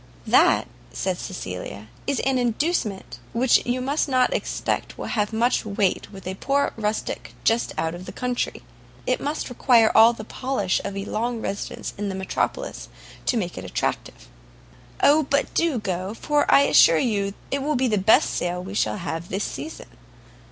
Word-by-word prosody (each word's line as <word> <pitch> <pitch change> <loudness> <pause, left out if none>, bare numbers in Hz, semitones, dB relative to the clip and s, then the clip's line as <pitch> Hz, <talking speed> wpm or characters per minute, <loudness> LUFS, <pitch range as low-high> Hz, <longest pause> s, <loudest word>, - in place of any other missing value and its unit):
"That," - - +4 0.2
said 185 -2 -2
Cecilia, 100 - -6 0.2
"is 280 -1 0
an 265 -1 +1
inducement 240 - -1
which 245 +2 +4
you 250 +1 0
must 280 +3 0
not 255 -1 +3
expect - - -2
will - - -5
have 210 -2 -1
much 235 +3 +1
weight 200 -3 -1
with 195 -2 -11
a 185 - -3
poor 275 +8 0
rustic 215 -1 -3
just 230 +1 +2
out 160 +1 -1
of 175 +1 -9
the - - -5
country: 250 -1 -3 0.4
it 255 - 0
must 295 +2 -2
require 240 -3 +4
all 225 +1 +8
the 230 -2 -8
polish 225 -5 -1
of 200 - -4
a 195 - -3
long 235 +3 -2
residence 200 -2 -4
in 205 -1 -2
the 190 - -4
metropolis 190 0 -3 0.4
to 245 - +2
make 180 - -3
it - - -8
attractive." 95 - -3 0.8
"O 300 +2 +6
but 280 -1 0
do 330 -6 +1
go, 190 -1 -3
for 295 +4 +1
I - - +7
assure 165 -11 +6
you 200 0 0 0.2
it 275 - 0
will 300 +2 0
be 260 0 +2
the 210 -3 +1
best 200 +4 +4
sale 180 0 -2
we 195 +2 -7
shall 205 - 0
have 170 -2 -5
this 195 +2 -2
season. 320 - -6
220 Hz, 175 wpm, -24 LUFS, 190-255 Hz, 0.8 s, all